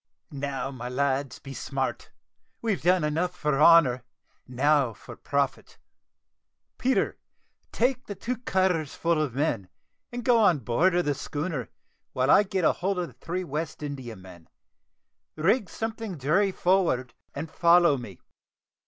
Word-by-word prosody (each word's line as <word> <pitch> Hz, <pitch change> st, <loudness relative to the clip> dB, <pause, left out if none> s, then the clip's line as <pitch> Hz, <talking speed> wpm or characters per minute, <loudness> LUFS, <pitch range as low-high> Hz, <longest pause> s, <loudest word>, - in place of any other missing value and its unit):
"Now, 140 Hz, -1 st, -3 dB
my 125 Hz, -2 st, -6 dB
lads, 135 Hz, +1 st, -1 dB
be 135 Hz, -, -10 dB
smart; 135 Hz, -1 st, -3 dB, 0.5 s
we've 220 Hz, -4 st, -1 dB
done 180 Hz, 0 st, +3 dB
enough 165 Hz, +4 st, -1 dB
for 150 Hz, -4 st, 0 dB
honour, 150 Hz, -7 st, +6 dB, 0.5 s
now 135 Hz, 0 st, +2 dB
for 90 Hz, -, -12 dB
profit. -, -, -2 dB, 1.0 s
Peter, 260 Hz, +2 st, +1 dB, 0.5 s
take 255 Hz, +1 st, 0 dB
the 205 Hz, -, -5 dB
two 250 Hz, +5 st, -3 dB
cutters 185 Hz, -, 0 dB
full 165 Hz, -2 st, +1 dB
of 140 Hz, -6 st, -2 dB
men, 120 Hz, -10 st, -1 dB, 0.4 s
and 240 Hz, -1 st, -6 dB
go 245 Hz, -2 st, +5 dB
on 190 Hz, -7 st, +5 dB
board 160 Hz, -, +2 dB
of 175 Hz, -, +1 dB
the 145 Hz, -, +1 dB
schooner, 145 Hz, -, -4 dB, 0.4 s
while 130 Hz, +2 st, +2 dB
I -, -, +7 dB
get 190 Hz, -4 st, -1 dB
hold 190 Hz, +4 st, +1 dB
of 175 Hz, -2 st, -2 dB
the -, -, -17 dB
three 180 Hz, +2 st, -4 dB
West 155 Hz, 0 st, -5 dB
Indiamen. 110 Hz, -, -8 dB, 0.9 s
Rig 190 Hz, +5 st, +1 dB
something 225 Hz, -4 st, -5 dB
jury 170 Hz, +9 st, +2 dB
forward, 175 Hz, -11 st, +1 dB, 0.2 s
and 160 Hz, +3 st, -5 dB
follow 170 Hz, -3 st, +5 dB
me." 115 Hz, -8 st, -9 dB
155 Hz, 140 wpm, -27 LUFS, 135-185 Hz, 1.0 s, I